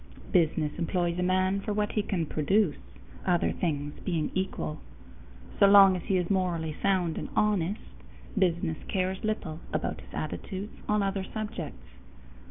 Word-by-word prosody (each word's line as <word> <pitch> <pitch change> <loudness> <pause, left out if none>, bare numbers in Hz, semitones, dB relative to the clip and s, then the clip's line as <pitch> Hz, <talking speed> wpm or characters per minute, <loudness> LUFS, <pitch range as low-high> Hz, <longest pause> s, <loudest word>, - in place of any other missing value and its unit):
Business 160 -4 +2
employs 175 0 0
a - - +1
man 185 +2 +2
for 210 - -2
what 210 0 0
he 210 - +1
can 185 -5 -1
produce, 155 +4 +1 0.4
other 175 -2 +2
things 145 -4 -2
being 165 -5 -1
equal. 185 -4 -2 0.8
So 200 - +8
long 195 -1 +8
as 180 - -3
he 190 - +2
is 180 -1 0
morally 170 -5 0
sound 185 -5 +1
and - - -5
honest, 205 -1 +1 0.5
business 175 -4 +1
cares 190 -1 -1
little 180 -7 -2
about - - -2
his - - -15
attitudes 200 +2 -5 0.2
on 210 -1 +3
other 195 0 -1
subjects. 200 - -6
185 Hz, 150 wpm, -29 LUFS, 165-200 Hz, 0.8 s, So